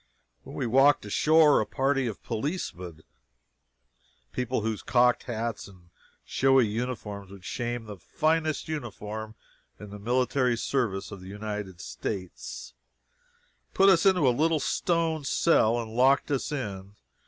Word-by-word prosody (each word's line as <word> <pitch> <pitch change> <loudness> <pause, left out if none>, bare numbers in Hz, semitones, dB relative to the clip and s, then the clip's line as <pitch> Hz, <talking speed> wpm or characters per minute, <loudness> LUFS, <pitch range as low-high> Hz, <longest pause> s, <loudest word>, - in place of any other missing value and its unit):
When - - -11
we - - -2
walked 135 +2 +4
ashore, 150 +7 +4
a - - -1
party 135 -1 0
of 110 - -6
policemen 110 - -4 1.3
(people 125 - -2
whose 110 -1 -2
cocked 125 0 +2
hats 115 -2 -4
and 90 -3 -18 0.3
showy 135 -2 +3
uniforms 105 -3 -4
would 95 -1 -13
shame 120 -1 -3
the 105 -2 -8
finest 155 - -1
uniform 110 -7 -6 0.4
in 105 -1 -10
the 105 - -8
military 125 +2 +1
service 110 -7 -1
of 100 -2 -9
the 95 - -11
United 105 -3 -6
States,) 95 -4 -6 1.0
put 195 +1 +6
us 170 -4 +5
into 185 -7 +4
a - - +5
little 160 +4 +2
stone 165 0 0
cell 120 -5 +3
and 115 -2 -5
locked 135 +4 +3
us 140 +1 -1
in. 100 -8 -5
120 Hz, 135 wpm, -27 LUFS, 105-140 Hz, 1.3 s, put